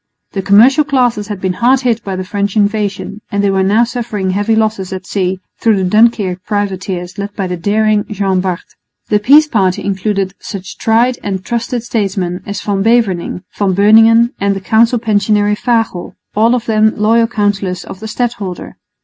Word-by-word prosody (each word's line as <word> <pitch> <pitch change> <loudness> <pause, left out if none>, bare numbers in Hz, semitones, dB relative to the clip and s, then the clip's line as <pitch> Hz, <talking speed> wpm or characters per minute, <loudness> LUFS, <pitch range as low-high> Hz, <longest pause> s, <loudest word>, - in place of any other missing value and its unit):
The 195 - -3
commercial 235 +10 +5
classes 245 -7 0
had 205 -3 -5
been 185 -1 -1
hard 250 +6 +2
hit 235 -3 0
by 195 -1 -4
the 185 - -4
French 200 +1 -3
invasion, 205 0 -1
and 200 0 0
they 200 - +2
were 190 0 +1
now 205 +5 +3
suffering 230 -5 -3
heavy 205 +4 0
losses 215 -4 -1
at 185 -1 -6
sea 185 -1 -2 0.2
through 225 -2 +3
the 190 - -1
Dunkirk 205 -3 +2
privateers 190 -3 -3
led 200 0 -5
by 195 - -2
the 180 -1 -3
daring 210 +3 +1
Jean 195 -3 0
Bart. 185 -2 -3 0.5
The 210 - +3
peace 290 +8 +5
party 190 -9 0
included 195 -1 -2
such 195 -2 -8
tried 235 +3 +2
and 190 -2 -4
trusted 235 0 -3
statesmen 195 -6 -2
as 200 - -4
Van 200 -2 -1
Beverningh, 200 -6 0
Van 195 -3 0
Beuningen 225 +4 +5
and 200 0 0
the - - -3
Council 225 +5 +2
Pensionary 210 -2 +1
Fagel, 225 -6 -1 0.2
all 225 +4 +3
of 240 -2 -3
them 220 -1 +2
loyal 225 +2 +3
counsellors 205 -5 -2
of 185 - -10
the 220 - -7
stadholder. 215 -5 -4
205 Hz, 180 wpm, -14 LUFS, 190-225 Hz, 0.5 s, commercial